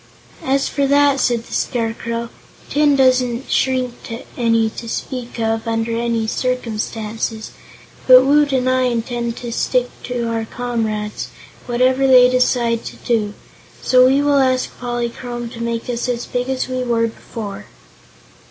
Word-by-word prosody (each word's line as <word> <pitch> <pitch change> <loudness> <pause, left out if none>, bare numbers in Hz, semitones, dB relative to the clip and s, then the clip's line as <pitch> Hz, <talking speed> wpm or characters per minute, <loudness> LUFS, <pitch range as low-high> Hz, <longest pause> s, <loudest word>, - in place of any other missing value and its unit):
"As 275 +1 +1
for 280 -2 0
that," 285 0 +4
said 240 -3 +1
the - - -11
Scarecrow, 230 0 -2 0.4
"tin 290 -1 +3
doesn't 255 -1 +2
shrink 255 -2 +1 0.4
any 230 -2 +2
to 230 - -8
speak 245 0 -5
of, 225 0 -1
under 225 0 -1
any 230 -1 0
circumstances. 225 -2 -3 0.6
But 255 0 +9
Woot 290 +1 +4
and 255 -1 +1
I 255 0 +2
intend 235 -1 -2
to 240 -1 -6
stick 250 +1 0
to 245 -1 -3
our 225 -1 -2
comrades, 220 -3 -3 0.4
whatever 255 +2 +2
they 250 -1 +7
decide 240 -2 +1
to - - -7
do, 215 -4 -1 0.5
so 255 0 +6
we 275 +2 +3
will 285 -1 +3
ask 255 -1 +1
Polychrome 240 0 -4
to 230 0 -9
make 235 0 -3
us 245 +1 -2
as 240 -1 -2
big 250 +1 -3
as 265 -1 -1
we 255 0 -2
were 235 -2 +1
before." 210 -2 -7
240 Hz, 145 wpm, -19 LUFS, 230-255 Hz, 0.6 s, But